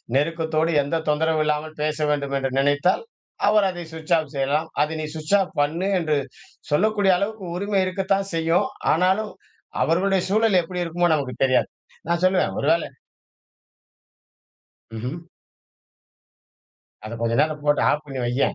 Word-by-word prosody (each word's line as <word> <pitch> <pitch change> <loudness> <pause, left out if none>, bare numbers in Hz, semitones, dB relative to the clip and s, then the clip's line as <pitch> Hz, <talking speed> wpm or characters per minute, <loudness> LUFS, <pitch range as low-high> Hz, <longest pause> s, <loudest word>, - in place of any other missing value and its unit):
நெருக்கத்தோடு, 160 +2 +1
எந்த 145 +4 -2
தொந்தரவும் 155 +1 +1
இல்லாமல் 150 +1 -2
பேச 155 0 -1
வேண்டும் 140 -2 -1
என்று 135 -1 -2
நினைத்தால், 145 - +2 0.4
அவர் 210 -1 +4
அதை 175 -1 -6
சுவிட்ச் 160 +1 -3
ஆஃப் 155 -3 -4
செய்யலாம். 145 +4 0
அதை 150 +2 0
நீ - - -3
சுவிட்ச் 155 +5 0
ஆஃப் 190 - -2
பண்ணு 165 +6 0
என்று 155 -3 0 0.5
சொல்லக்கூடிய 200 +4 +3
அளவுக்கு 200 +1 -3
உரிமை 200 +1 0
இருக்கத்தான் 195 +1 -1
செய்யும். 165 +6 +2 0.3
ஆனாலும், 190 +6 +1 0.5
அவர்களுடைய 190 +3 +2
சூழல் 210 -2 +3
எப்டி 180 +1 -4
இருக்குமோ! 175 +1 0
நமக்கு 135 -4 -3
தெரியாது. 130 -1 +2 0.4
நான் 170 +1 0
சொல்லுவேன் 185 0 +2
ஒருவேள - - +2 2.1
ம்ஹ்ம். 125 +7 -4 1.9
அத 110 - -7
கொஞ்ச 115 0 +1
நேரம் 155 -1 -2
போட்டு 145 0 +2
ஆஃப் 150 +1 -1
பண்ணி 135 -2 -5
வையேன். 125 +3 0
160 Hz, 135 wpm, -23 LUFS, 150-185 Hz, 2.1 s, அவர்